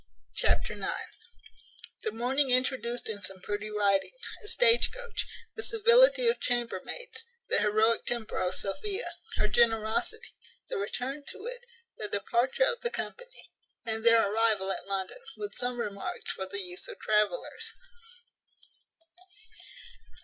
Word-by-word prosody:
Chapter - - +1
ix. - - -9 1.2
The - - -2
morning 260 +5 +1
introduced 250 -1 +1
in 205 -2 -4
some 190 -1 -4
pretty 205 +3 -4
writing. 200 -2 +2 0.3
A - - -9
stagecoach. 480 0 +4 0.3
The 440 - -4
civility 475 +3 +5
of 465 - +3
chambermaids. 245 - -2 0.3
The - - +4
heroic 215 +2 +2
temper 235 -2 -1
of 185 0 0
Sophia. 390 - -2 0.3
Her 210 - +2
generosity. 230 - +1 0.4
The - - -2
return 255 +8 -3
to 410 - -9
it. - - -5 0.4
The 210 - -3
departure 235 - +1
of 485 -1 -1
the 475 - 0
company, - - -7 0.3
and 220 -1 -1
their 230 -2 +6
arrival 210 -2 +3
at 195 - -4
London; 195 - -2 0.2
with 415 -1 -5
some 245 0 -2
remarks 200 -3 -4
for 190 - -5
the 200 +1 -3
use 180 -1 -5
of - - -8
travellers. 210 -4 0
235 Hz, 130 wpm, -30 LUFS, -, 1.2 s, their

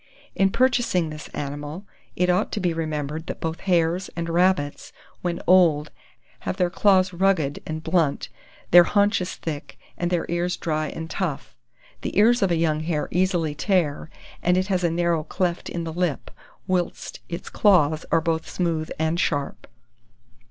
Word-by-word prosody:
In 195 0 +3
purchasing 230 -9 +1
this 155 0 -8
animal, 145 +6 -6 0.3
it 180 - +1
ought 180 +3 +1
to - - -1
be 180 -3 0
remembered 155 -1 -3
that - - -5
both 165 0 -3
hares 175 -1 +1
and 170 0 -3
rabbits, 175 -4 +1 0.3
when 175 -1 -2
old, 165 -5 +4 0.5
have - - -4
their 180 -1 +1
claws 185 -1 +3
rugged 175 -6 +1
and 155 0 -4
blunt, 160 -4 0 0.4
their 175 0 +9
haunches 205 -2 +1
thick, 150 -2 -6 0.2
and 175 - 0
their 175 -2 0
ears 175 +1 -1
dry 155 -1 -1
and 160 +1 -6
tough. - - -4 0.5
The - - -4
ears 235 +4 +5
of 195 - +3
a 170 - +1
young 160 -2 +1
hare 155 -1 -2
easily 175 -4 +1
tear, 160 -2 0 0.3
and 180 +1 +2
it 185 +2 0
has 185 -2 +1
a 170 - +3
narrow 170 -1 0
cleft 175 +2 -2
in 170 - -4
the 165 -1 -5
lip; 175 -4 -2 0.3
whilst 185 -2 -2
its 170 +1 -6
claws 160 -7 +3
are 165 - +4
both 160 0 -1
smooth 165 -3 -1
and 160 +2 0
sharp. 145 -4 -2
170 Hz, 165 wpm, -24 LUFS, 155-185 Hz, 0.5 s, their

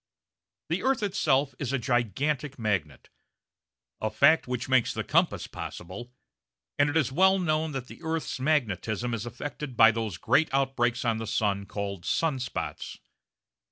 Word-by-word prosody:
The - - 0
earth 265 -4 +1
itself 145 -9 +1
is 135 -3 -2
a 135 - +1
gigantic 130 +4 -1
magnet, 100 - -2 0.9
a 110 - 0
fact 140 +9 +4
which 125 -1 -3
makes 130 -3 +3
the - - -2
compass - - +1
possible, 100 +8 -8 0.7
and 145 0 +4
it 150 - 0
is 145 -5 +1
well 190 +6 +4
known 160 -3 0
that 135 -2 -4
the - - -13
earth's 160 -4 -3
magnetism 120 - 0
is 115 0 -3
affected 135 +1 -6
by 115 -2 +8
those 110 -5 -3
great 160 - +2
outbreaks 130 -3 +1
on 115 -1 +1
the 115 - -5
sun 100 -2 0
called 100 -3 -4
sun 155 -5 0
spots. 85 -11 -5
125 Hz, 155 wpm, -28 LUFS, 110-150 Hz, 0.9 s, by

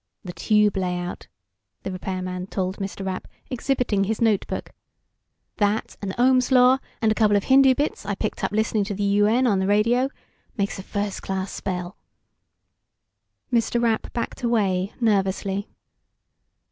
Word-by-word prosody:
"The 180 - -7
tube 210 +4 +2
layout," 180 -1 -3 0.6
the 195 - -4
repairman 185 0 -4
told 190 0 -2
Mr. 195 -1 -5
Rapp, 185 -1 -4 0.2
exhibiting 250 -5 0
his 220 +2 -2
notebook. 220 -4 0 0.9
"That, 205 +1 0
and 190 -2 -4
Ohm's 255 +1 +3
Law, 255 +1 +6 0.2
and 220 - +4
a - - +4
couple 210 -2 +3
of 200 - -1
Hindu 265 0 +6
bits 290 +3 -2
I 200 0 -2
picked - - -4
up - - 0
listening 215 0 +1
to 200 -1 -4
the 205 - -2
UN 205 +5 +3
on 205 -6 +3
the 190 - 0
radio... 230 +6 +3 0.5
makes 200 -1 -1
a - - -4
first 200 +1 -3
class 190 0 -3
spell." 180 -1 -4 1.6
Mr. 235 0 +2
Rapp 230 -2 0
backed 235 - -4
away, 200 -5 +1
nervously. 200 -2 0
205 Hz, 145 wpm, -24 LUFS, 190-230 Hz, 1.6 s, Law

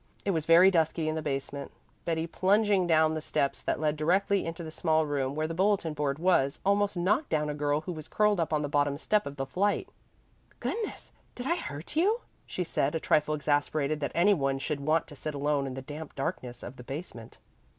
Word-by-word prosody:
It 200 - +2
was 160 -4 -2
very 175 +3 +7
dusky 165 -2 +1
in 155 - 0
the 160 - -2
basement. 140 -1 -4 0.4
Betty, 165 -1 0
plunging 195 +2 +2
down 160 -1 +4
the 155 - -3
steps 140 -1 -1
that - - -1
led 155 -1 +1
directly 190 +4 +2
into 165 +1 -5
the 160 - -7
small 160 -1 +1
room 140 -2 -1
where 155 +1 -1
the 165 - -4
bulletin 190 -2 +1
board 145 -2 -1
was, 160 -5 +2
almost 200 -1 +2
knocked 210 - +1
down 150 -1 0
a - - -3
girl 145 0 0
who 170 - -5
was 155 -3 -7
curled 210 -2 +2
up 165 - 0
on 150 -1 +1
the - - -1
bottom 145 -1 +1
step 210 +5 +1
of 140 - -6
the 135 -1 -3
flight. 200 +9 0 0.7
"Goodness! 445 -2 -4 0.2
did 245 - -6
I 340 - +2
hurt 160 - -7
you?" 415 +9 +2 0.3
she 180 - -2
said, 150 -3 0
a - - +1
trifle 155 0 +2
exasperated 145 0 0
that 140 - -2
any 190 +5 +5
one 135 -6 0
should 140 +2 -3
want 155 +3 +1
to 145 - -12
sit 150 +1 -5
alone 140 -1 0
in 130 - -5
the 135 - -6
damp 150 +2 -8
darkness 125 -2 -4
of 120 - -8
the 125 - -10
basement. 135 -4 -8
155 Hz, 220 wpm, -29 LUFS, 145-180 Hz, 0.7 s, very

